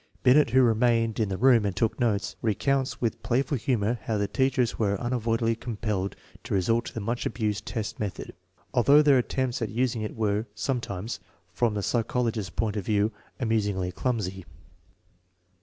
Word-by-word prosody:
Binet, 130 +2 +5
who 130 +2 +5
remained 115 -1 +2
in 110 -3 +1
the 95 - -2
room 125 -2 +5
and 100 -3 -1
took 110 +5 0
notes, 110 -5 0
recounts 130 +5 0
with 115 -2 -2
play 130 +3 +1
ful 140 - -2
humor 120 -2 0
how 110 - 0
the 100 0 0
teachers 130 +1 +1
were 100 -3 +1
unavoidably 115 -1 0
compelled 105 -4 -3 0.3
to - - -2
resort 115 +5 +1
to - - -7
the - - -2
much 115 +4 -2
abused 105 -2 -2
test 110 -4 -4
method, 100 -5 -4 0.4
although 140 +5 +6
their 140 -3 +5
attempts 125 0 -1
at 110 - -1
using 120 +1 0
it 105 - -4
were 110 0 0
sometimes, 115 -5 -3 0.3
from 115 +1 +1
the 100 - -1
psycholo 120 +1 0
gist's 105 -4 -4
point 110 +1 -2
of 100 - -2
view, 105 0 +2 0.3
amusingly 105 -6 0
clumsy. 95 -4 -2
115 Hz, 175 wpm, -27 LUFS, 105-125 Hz, 0.4 s, although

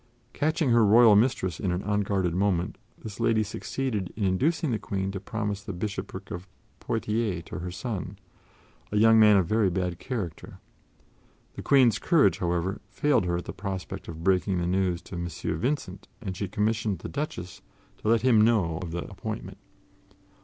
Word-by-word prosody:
Catching 155 -2 +1
her 115 -1 +5
royal 110 +1 +7
mistress 100 -6 +1
in 95 - -1
an 90 +2 -2
unguarded 100 -4 0
moment, 90 -2 0 0.2
this 105 0 -9
lady 115 -2 +2
succeeded 105 -2 -3
in 110 - -2
inducing 140 - +1
the 110 - -1
Queen 95 -1 -3
to 95 - -5
promise 105 0 -3
the 100 - -6
bishopric 100 +3 -5
of 90 +2 -6 0.3
Poitiers 105 -5 -1
to - - -6
her 90 +1 -4
son, 100 +2 -5 0.7
a 105 - 0
young 110 +1 +6
man 105 -2 +7
of 95 - +3
very 105 +1 +2
bad 90 -1 -2
character. 105 - -5 1.0
The - - -7
Queen's 130 -5 +4
courage, 145 - +3
however, 90 +3 -1
failed 135 0 +2
her 85 -1 0
at 90 - -5
the - - -6
prospect 95 -2 -5
of 80 0 -8
breaking 95 0 +2
the 85 - -1
news 90 -1 0
to - - -12
M. 85 0 -3 0.3
Vincent, 105 -7 -3
and 95 -6 -5
she 100 +2 -3
commissioned 105 0 0
the - - -7
Duchess 140 - -5 0.4
to - - -6
let 115 0 +3
him 120 -4 +5
know 100 -8 +2
of 90 - -5
the 85 +1 -4
appointment. - - -6
100 Hz, 175 wpm, -27 LUFS, 90-115 Hz, 1.0 s, royal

